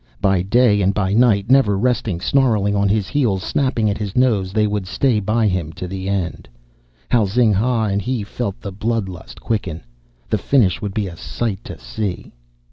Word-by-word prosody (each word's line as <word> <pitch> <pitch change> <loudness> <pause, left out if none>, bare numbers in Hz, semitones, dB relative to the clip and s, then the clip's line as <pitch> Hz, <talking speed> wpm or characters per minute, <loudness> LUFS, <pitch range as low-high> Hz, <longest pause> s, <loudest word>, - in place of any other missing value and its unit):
By 95 -2 +2
day 105 +1 +3
and 95 +1 +1
by 95 -2 0
night, 110 -2 +3
never 130 -7 +4
resting, 110 -5 0
snarling 110 -6 +2
on 100 0 +2
his 105 -2 +1
heels, 110 -7 0
snapping 130 -6 0
at 100 0 -1
his 100 -3 -4
nose, 110 -7 +2
they 105 +1 +2
would 105 -3 -2
stay 120 +2 +1
by 110 +3 +1
him 90 -5 -1
to 90 - -6
the 95 +1 -5
end. 95 -4 -3 0.6
How 115 -4 +3
Zing 110 +2 +2
ha 115 +3 +1
and 100 -1 0
he 125 0 -2
felt 100 0 -4
the 100 - -6
blood 110 +1 -2
lust 85 -10 -10
quicken! 95 -8 -3 0.4
The 105 - 0
finish 105 -6 +2
would 100 -2 -4
be 105 - 0
a 90 -3 -7
sight 100 +4 -4
to - - -8
see! 105 -5 -5
105 Hz, 195 wpm, -19 LUFS, 95-115 Hz, 0.6 s, never